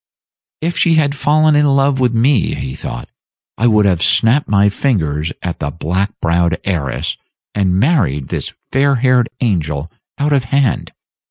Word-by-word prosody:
"If 170 +2 -2
she 165 -2 +3
had 145 -3 +2
fallen 155 +2 +2
in 150 0 +3
love 135 -1 +2
with 125 -2 +2
me," 120 0 +1
he 65 -1 -5
thought, - - -7 0.5
"I 120 - +1
would 105 -2 +3
have 90 -4 +1
snapped 120 - +3
my 100 0 +3
fingers 80 - -1
at 90 -2 -4
the 70 - -2
black 90 +6 -2
browed 85 0 +1
heiress, 80 -9 -2 0.4
and 95 -2 +1
married 100 - +1
this - - -3 0.2
fair 140 +1 +2
haired 125 -1 +2
angel 80 - -1 0.3
out 145 +1 0
of 135 -4 +1
hand. 135 0 0
115 Hz, 160 wpm, -16 LUFS, 85-140 Hz, 0.5 s, she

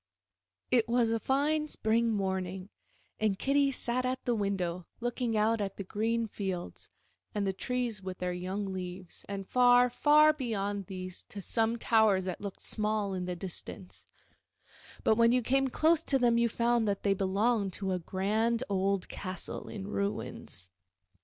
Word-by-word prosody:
* - - -62 0.3
It 235 -2 +3
was 235 -1 +3
a 230 - +1
fine 300 +5 +1
spring 230 -3 +1
morning, 190 -2 -2 0.5
and 215 -3 +1
Kitty 275 +3 +2
sat 250 -1 0
at 255 +1 -2
the 245 - +2
window 185 -5 -2
looking 240 -1 -1
out 220 +1 +2
at 195 -1 -3
the 200 - -4
green 225 +4 -1
fields 190 -4 -5 0.5
and 205 -1 0
the 190 - 0
trees 240 0 -2
with 185 -1 -6
their 180 0 -2
young 190 +2 -3
leaves, 180 -1 -7
and 195 -1 -5
far, 245 0 +5
far 305 +3 +5
beyond 205 -8 -3
these 185 -2 -5
to 200 - -7
some 225 +3 +1
towers 220 -5 +3
that 185 -2 -4
looked 200 -2 -6
small 210 -2 -1
in 180 -1 -3
the 180 0 -3
distance, 185 +1 -8 1.0
but 220 - +3
when 230 0 +5
you 250 0 +2
came 270 +3 +2
close 315 +5 +3
to 280 -4 +2
them 240 -2 +3
you 235 0 +3
found 235 -1 +1
that 200 -1 -1
they 200 - +3
belonged 195 +2 +1
to 195 0 -3
a 180 - 0
grand 215 +7 0
old 195 -1 0
castle 185 -2 -5
in 195 -3 -6
ruins. 200 - -4
210 Hz, 165 wpm, -31 LUFS, 190-240 Hz, 1.0 s, far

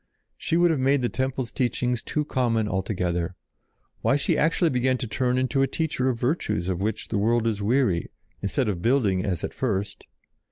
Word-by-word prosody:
She 165 - -1
would 175 0 +4
have 155 - 0
made 135 0 +2
the 120 - +1
temple 130 0 -1
teachings 125 0 -1
too 150 -1 -2
common 115 -6 +1
altogether. 90 -3 -1 0.7
Why, - - +3
she 145 - +1
actually 165 +2 +2
began 130 0 +1
to 125 - -4
turn 125 +3 0
into 130 +2 +1
a 135 - +3
teacher 150 -5 -1
of 120 -3 -2
virtues 120 - -1
of 90 0 -2
which 110 +1 -2
the 105 - 0
world 115 +2 +2
is 110 -3 0
weary, 110 -5 +1 0.3
instead 110 +5 0
of 95 -5 -2
building 105 -6 +2
as 90 -5 -2
at - - -3
first. 105 -6 -2
120 Hz, 190 wpm, -25 LUFS, 100-130 Hz, 0.7 s, would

